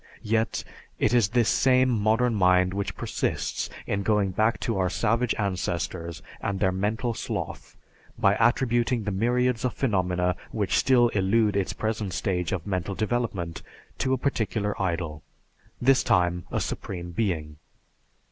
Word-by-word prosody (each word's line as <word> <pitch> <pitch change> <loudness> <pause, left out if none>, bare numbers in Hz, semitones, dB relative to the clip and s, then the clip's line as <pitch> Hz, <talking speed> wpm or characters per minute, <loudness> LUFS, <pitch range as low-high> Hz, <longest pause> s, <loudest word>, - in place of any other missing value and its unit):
Yet, 110 +1 0 0.3
it 110 - +1
is 115 -6 +4
this 120 0 +2
same 130 -1 +4
modern 115 +2 +2
mind 90 -2 +3
which 100 0 -3
persists - - -2 0.2
in 100 - -1
going 100 -1 +1
back 110 +5 +1
to 115 -5 -1
our 90 -1 +2
savage 115 +5 +1
ancestors 85 -3 -3 0.2
and 100 -1 -2
their 95 -1 +2
mental 110 +5 -1
sloth, - - -5 0.4
by 100 +1 +3
attributing 120 -1 +2
the 105 - -2
myriads 120 +4 +1
of 125 - -1
phenomena 90 -7 +1 0.2
which 105 -4 0
still 120 -3 +4
elude 105 +1 +2
its 100 -2 0
present 110 -3 -2
stage 90 -2 -1
of 90 -3 -2
mental 95 -1 -2
development, 105 -5 -2 0.4
to 130 - 0
a - - +2
particular 110 -5 -1
idol, 85 -4 -2 0.6
this 130 +1 +4
time, 90 -1 +1
a - - 0
Supreme 85 -2 -4
Being. 80 -7 -2
105 Hz, 145 wpm, -26 LUFS, 90-115 Hz, 0.6 s, is